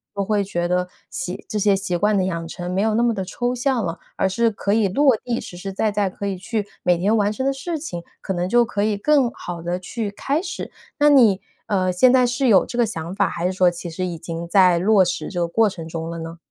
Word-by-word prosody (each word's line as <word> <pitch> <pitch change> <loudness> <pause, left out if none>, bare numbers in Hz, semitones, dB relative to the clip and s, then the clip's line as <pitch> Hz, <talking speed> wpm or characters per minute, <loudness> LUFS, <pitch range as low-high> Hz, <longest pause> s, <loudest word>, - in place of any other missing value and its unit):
能 200 -1 -1
会 205 0 +1
觉 175 -3 -2
得 180 0 0 0.2
习 - - -5
这 215 - -2
些 205 -1 +3
习 190 -2 -2
惯 205 +3 +2
的 190 - +2
养 170 -3 -3
成 175 +2 -5
没 190 - +1
有 215 0 +1
那 235 - +2
么 240 -1 +2
地 195 -3 -3
抽 245 +6 -2
象 250 -3 0
了， 165 0 -4 0.2
而 - - +1
是 230 +5 +2
可 200 -1 -1
以 215 -2 +3
落 265 +6 +4
地， 240 -1 -1
实 - - -9
实 195 +2 -6
在 210 +2 0
在 205 -1 0
可 200 - -7
以 200 -1 -1
去 205 +3 -3 0.2
每 175 -1 +2
天 200 +6 +2
完 205 -1 +2
成 260 +5 -3
的 275 - +2
事 320 +5 -4
情， 185 - -6 0.2
可 190 - -3
能 175 0 -2
就 240 +3 +4
可 205 -3 -2
以 210 -1 +1
更 275 +3 +3
好 175 -7 -7
地 175 +1 -2
去 210 +3 -4
开 275 +9 -1
始。 385 - -6 0.3
那 295 -1 +5
你， 230 -9 +5 0.3
呃， 185 -2 +1
现 245 +8 +5
在 255 -1 +5
是 245 +2 0
有 195 -4 +5
这 240 - -7
个 240 - +4
想 170 -4 -5
法， 200 -1 +2
还 170 - -4
是 185 - +1
说 185 -1 +4
其 175 0 -7
实 185 +3 -3
已 175 -2 -4
经 165 +1 -6
在 180 -1 +5
落 200 +1 +5
实 180 - -3
这 180 - -4
个 170 - +1
过 220 +5 +3
程 165 -4 -8
中 165 0 -5
了 170 0 -5
呢？ 165 +1 -7
200 Hz, 285 characters per minute, -22 LUFS, 180-230 Hz, 0.3 s, 那